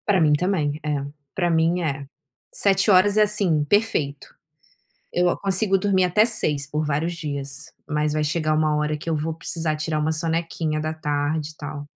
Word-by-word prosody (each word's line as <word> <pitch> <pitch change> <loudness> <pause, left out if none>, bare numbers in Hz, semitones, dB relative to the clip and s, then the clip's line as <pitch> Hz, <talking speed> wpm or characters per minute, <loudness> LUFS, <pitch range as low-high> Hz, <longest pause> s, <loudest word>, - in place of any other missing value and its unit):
Para 200 -3 +3
mim 150 -2 +4
também 155 -3 0
é, 145 -2 -2 0.3
para 175 -2 +1
mim 165 +2 +2
é, 140 -4 -3 0.5
7 195 +1 +2
horas 200 +2 +4
é, 215 - +6
assim, 195 -7 +2
perfeito. 155 -8 0 0.9
Eu 175 0 +2
consigo 195 0 +2
dormir 190 -1 +2
até 180 +4 +4
6 150 -11 0
por 150 +1 -2
vários 155 +4 -1
dias, 140 -3 -5 0.2
mas 150 0 0
vai 155 0 0
chegar 155 0 0
uma 155 -1 +1
hora 150 0 -1
que 150 - -9
eu 160 - +1
vou 155 +2 -2
precisar 165 -1 -2
tirar 155 0 -2
uma 155 +1 0
sonequinha 165 -1 -1
da 155 +1 -2
tarde 150 0 -2
e 155 - -13
tal. 145 -1 -7
155 Hz, 180 wpm, -23 LUFS, 150-180 Hz, 0.9 s, é